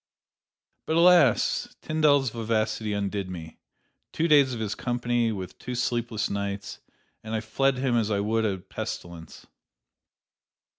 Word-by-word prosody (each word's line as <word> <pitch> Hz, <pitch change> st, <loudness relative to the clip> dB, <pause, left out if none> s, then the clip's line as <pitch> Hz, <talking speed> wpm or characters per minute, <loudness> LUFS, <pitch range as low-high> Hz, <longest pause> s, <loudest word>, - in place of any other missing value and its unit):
"But, 160 Hz, -, 0 dB
alas! 170 Hz, -7 st, +4 dB
Tyndall's 145 Hz, -5 st, +3 dB
vivacity 110 Hz, -1 st, -1 dB
undid 100 Hz, -1 st, -2 dB
me: 80 Hz, -3 st, -8 dB, 0.5 s
two 165 Hz, -, 0 dB
days 145 Hz, -4 st, +5 dB
of 120 Hz, -, -4 dB
his 110 Hz, -2 st, -2 dB
company, 120 Hz, -1 st, 0 dB
with 95 Hz, -3 st, -7 dB
two 125 Hz, -, -5 dB
sleepless 120 Hz, -2 st, -1 dB
nights, 100 Hz, 0 st, -4 dB, 0.4 s
and 110 Hz, +1 st, -4 dB
I -, -, 0 dB
fled 130 Hz, +5 st, 0 dB
him 130 Hz, -2 st, 0 dB
as 110 Hz, -2 st, +1 dB
I 100 Hz, -2 st, 0 dB
would 110 Hz, +2 st, 0 dB
a 100 Hz, -3 st, 0 dB
pestilence." 90 Hz, -4 st, -8 dB
110 Hz, 135 wpm, -26 LUFS, 100-125 Hz, 0.5 s, days